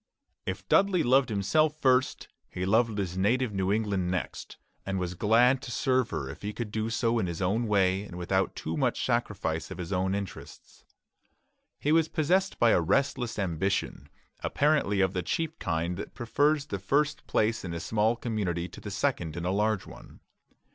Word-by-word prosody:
If - - -4
Dudley 190 -4 +3
loved 130 +1 +4
himself 145 +10 +1
first, 130 -2 +2 0.2
he 90 - -4
loved 110 +2 +2
his 95 -2 -2
native 120 +4 +1
New 95 0 0
England 100 -4 0
next, 90 -2 -4 0.3
and 95 0 -2
was 90 -1 -2
glad 120 +7 +3
to - - -8
serve 130 0 +1
her 65 - -3
if 70 - -9
he 105 +1 -4
could 110 0 -5
do 110 +1 -2
so 115 0 +1
in 95 - 0
his 85 -1 -4
own 105 +5 0
way 95 -2 +2
and 95 -4 -9
without 95 +2 0
too 80 - -4
much - - 0
sacrifice 80 0 -1
of 95 - -7
his 90 +1 -4
own 95 +1 0
interests. 100 -2 -8 0.9
He 150 - 0
was 160 0 +4
possessed 180 +5 +1
by 120 -1 +4
a - - +4
restless 120 - 0
ambition, 95 -6 -2 0.3
apparently 140 -10 +1
of 95 0 +2
the 90 - -1
cheap 160 - -3
kind 85 +2 -2
that - - -7
prefers 145 +5 +1
the 100 - -4
first 145 +9 0
place 110 +1 +1
in 90 - -5
a 85 - -4
small 110 +5 +1
community 100 -8 -2
to - - -12
the - - -6
second 80 -1 -1
in 85 - -4
a 90 - +1
large 105 0 0
one. - - -14
105 Hz, 185 wpm, -28 LUFS, 95-125 Hz, 0.9 s, loved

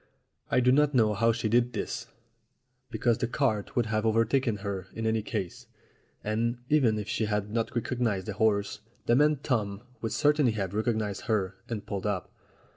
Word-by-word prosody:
I 125 - +3
do 125 +1 +4
not 145 +1 +3
know 110 -3 +4
how 115 +3 +3
she 115 -1 -1
did 120 +2 +2
this, 115 0 -4 0.8
because 120 -2 +1
the 120 - 0
cart 120 -5 -1
would 120 - +2
have 110 0 0
overtaken 115 +1 +2
her 95 -2 -3
in 115 - -3
any 110 0 +1
case, 95 -4 -5 0.6
and, 115 +3 0
even 130 -8 +3
if 105 -1 -4
she 110 0 0
had 105 -1 -1
not 115 +3 -2
recognized 115 -5 -1
the - - -4
horse, 100 -3 +1 0.3
the 120 - +4
man 150 +3 +4
Tom 105 -5 -1 0.2
would 115 - -2
certainly 145 -5 +3
have 100 -3 -3
recognized 110 -2 -1
her, 100 -4 0 0.2
and 105 -3 -4
pulled 100 +1 -3
up. 100 -4 -2
110 Hz, 180 wpm, -28 LUFS, 105-120 Hz, 0.8 s, do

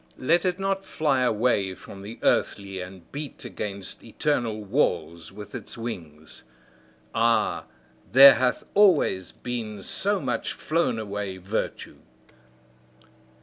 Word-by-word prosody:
Let 170 +8 +2
it 180 -1 +1
not 195 0 -1
fly 145 -8 0
away 110 -5 +1
from 95 - -11
the 105 +4 -8
earthly 95 -2 0
and 90 -1 -11
beat 145 -1 -7
against 100 -2 -6
eternal 115 -3 -1
walls 85 - -1
with 105 -1 -10
its 105 - -6
wings! 80 -10 -7 0.7
Ah, 115 -1 +2 0.5
there 135 +2 +10
hath 125 -1 0
always 160 - +4
been 110 -5 -5
so 200 - 0
much 130 -6 -2
flown 155 -7 0
away 100 -3 -4
virtue! 95 +4 -4
110 Hz, 115 wpm, -26 LUFS, 95-135 Hz, 0.7 s, there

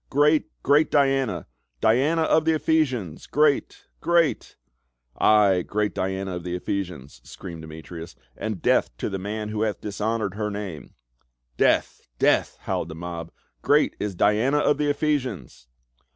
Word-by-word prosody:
" - - -46
Great 150 +2 +3
— - - -46
Great 145 +2 +4
Diana! 135 - +1 0.3
Diana 140 - +3
of 160 0 +3
the 160 0 +2
Ephesians! 130 - 0
Great 150 -1 +1
— - - -44
great 170 -1 +1 0.3
!" - - -31
"Ay, 100 -4 +5
great 105 +3 -1
Diana 95 -1 -2
of 90 - -8
the 90 0 -3
Ephesians!" 90 -7 -5
screamed 85 -3 -9
Demetrius, 80 +2 -9
" - - -40
and 110 -6 -5
death - - +3
to - - -3
the 95 - -3
man 105 +2 -4
who 105 0 -3
hath 110 -2 -1
dishonored 105 0 -2
her 105 +1 -2
name 100 -6 -7 0.3
!" - - -47
"Death! - - +2 0.2
Death!" - - +2
howled 80 - -3
the 80 - -7
mob. 85 0 -6 0.3
"Great - - +3
is 105 -2 -3
Diana 110 +10 +2
of 145 0 +2
the 150 -1 +1
Ephesians 130 - -2
105 Hz, 165 wpm, -24 LUFS, 85-140 Hz, 0.3 s, Ay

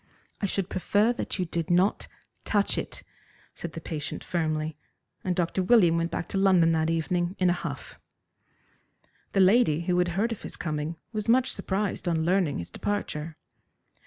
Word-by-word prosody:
"I 200 - +1
should 195 -1 -1
prefer 205 +5 +2
that 240 - -3
you 185 - 0
did 165 -1 -3
not 180 +3 +2 0.4
touch 205 -2 +1
it," - - -5 0.5
said 170 - -7
the - - -5
patient 155 -3 -5
firmly, 155 -2 -1 0.5
and 185 -1 0
Dr. 175 +1 0
William 185 -4 +5
went 170 0 0
back 175 - -3
to 195 - -1
London 185 -4 +5
that 160 0 +1
evening 175 +2 0
in 180 -1 +3
a - - +3
huff. 175 - -6 1.3
The 195 - +2
lady, 185 -5 +4
who 180 +1 +1
had 180 - +3
heard 225 +4 +1
of 225 - -5
his - - -8
coming, 155 0 -3 0.2
was 215 +1 -3
much 255 +2 +4
surprised 195 -1 -2
on 160 -2 +1
learning 180 -4 +2
his 85 0 -6
departure. 165 - -3
175 Hz, 170 wpm, -27 LUFS, 165-195 Hz, 1.3 s, William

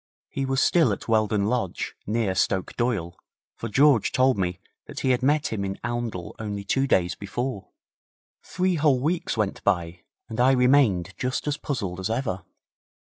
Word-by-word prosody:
He 135 -1 -3
was 135 0 +1
still 160 -4 +4
at - - -7
Weldon 110 -2 +2
Lodge, 110 -5 -2
near 110 -2 0
Stoke 95 0 0
Doyle, 105 -8 -1 0.4
for 115 - -5
George 135 -1 +4
told 130 0 +3
me 90 -2 -2 0.3
that - - -7
he 130 - +2
had 125 0 +1
met 145 0 +1
him 100 -2 -2
in 95 0 -3
Oundle 120 -7 -4
only 105 -2 -4
two 135 +7 +1
days 90 -6 +2
before. 105 +2 -4 0.7
Three 185 +1 -1
whole 145 -4 +3
weeks 160 -1 -1
went 105 -3 -1
by, 85 -1 0 0.3
and 110 - -6
I 130 +2 +5
remained 125 -9 +3
just 125 0 -2
as 145 0 0
puzzled 100 -13 -4
as 95 +3 -2
ever. 110 -6 -2
115 Hz, 170 wpm, -25 LUFS, 95-130 Hz, 0.7 s, I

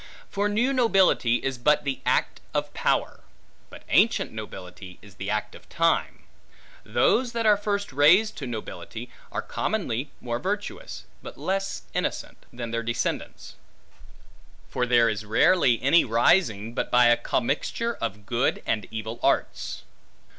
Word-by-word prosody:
For 205 +1 0
new 240 +6 +1
nobility 195 - +3
is 135 -2 -2
but 150 +5 +3
the 135 -2 -3
act - - +1
of - - -1
power, - - 0 0.5
but - - -13
ancient - - +3
nobility 90 0 -9
is 100 -1 -15
the 100 +1 -6
act 105 0 -2
of - - -15
time. 165 +1 0 0.6
Those 245 -2 +2
that 230 -1 -1
are 210 -1 +6
first 200 -4 -3
raised 180 +11 +5
to 135 - -5
nobility, 115 -3 -7 0.2
are - - -3
commonly 145 - -2
more 120 -1 -3
virtuous, 190 - -4 0.2
but - - -10
less 195 +6 -2
innocent, - - -4
than 120 -1 -6
their 115 0 -1
descendants; 120 +1 -4 1.1
for 125 - -1
there 120 -1 +5
is 110 -1 -2
rarely 120 - +3
any 155 +6 +5
rising, 115 - +2
but - - -2
by 125 0 +5
a 120 0 +6
commixture 140 - -1
of 100 +1 -5
good 120 +3 0
and 105 -3 -1
evil 110 +1 -6
arts. - - -1
125 Hz, 145 wpm, -25 LUFS, -, 1.1 s, are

